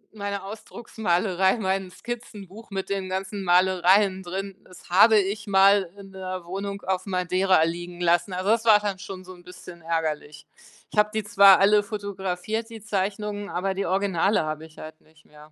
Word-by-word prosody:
meine 200 -1 -4
Ausdrucksmalerei, 195 -2 -1
mein 190 -2 -2
Skizzenbuch 220 0 -9
mit 195 -1 -5
den 190 -1 -3
ganzen 195 +1 -4
Malereien 185 +2 +3
drin, 190 +2 -6
das 185 -1 -17
habe 215 +4 +6
ich 205 +2 -1
mal 195 -1 +4
in 195 -1 -12
'ner 185 -2 -6
Wohnung 200 +2 -5
auf 190 +1 -2
Madeira 185 -1 +2
liegen 175 +1 -4
lassen. 175 +2 +1
Also, 185 +3 -2
das 225 0 +2
war 215 -2 +7
dann 205 -3 -4
schon 195 -2 -8
so 185 0 -11
'n 175 - -16
bisschen 180 -1 -12
ärgerlich. 155 -2 -3 0.5
Ich 210 - 0
habe 210 0 +4
die 220 0 -2
zwar 200 -1 +6
alle 205 +1 +5
fotografiert, 200 +1 -4
die 225 -2 -11
Zeichnungen, 205 0 -3
aber 190 +2 -2
die 195 -1 -3
Originale 195 +1 +1
habe 155 +1 -5
ich 155 - -23
halt 155 0 -11
nicht 155 0 -26
mehr. 150 0 -17
190 Hz, 175 wpm, -24 LUFS, 180-205 Hz, 0.5 s, war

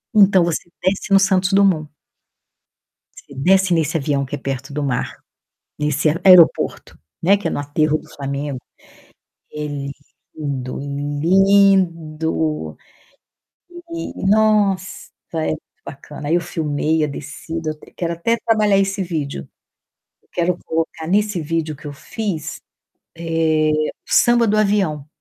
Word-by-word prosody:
Então, 195 -3 +6
você 170 -2 -1 0.2
desce 190 +2 -1
no 195 - +7
Santos 190 0 +2
Dumont 190 -6 +3 1.4
você - - -13
desce 190 +6 +3
nesse 160 -1 +1
avião 140 -2 -1
que 135 - -5
é - - -6
perto 135 0 -5
do 150 +1 -2
mar 125 -3 -2 0.6
nesse 150 +1 +1
ae 150 - 0
aeroporto, 180 -4 +5 0.3
né, 195 +4 +5
que 205 - -3
é - - -2
no - - -2
Aterro 150 +2 +1
do 155 - -15
Flamengo. 140 -1 -4 0.9
É 150 0 -5 0.7
lindo, 135 -4 -4
lindo 160 - +1 1.2
e 335 -11 -5
nossa, 205 -3 +3 0.5
é 160 -1 -1
muito - - -1 0.3
bacana, 145 +1 -8
aí 160 - +2
eu - - +1
filmei 155 -2 -1
a - - +1
descida, 155 +3 -6
eu - - -4
até 150 - -18
quero 170 -1 -2
até 230 +8 0
trabalhar 215 -3 +3
esse 195 0 0
vídeo, 150 - -4 0.8
eu - - -34
quero 175 0 0
colocar 160 0 -3
nesse 205 +1 +1
vídeo 160 0 -2
que - - -15
eu 145 - -6
fiz, 185 +1 -5 0.6
eh, 165 -2 +1 0.4
o - - -12
Samba 240 -1 +5
do 215 +1 +2
Avião. 195 -9 +1
165 Hz, 140 wpm, -20 LUFS, 150-195 Hz, 1.4 s, no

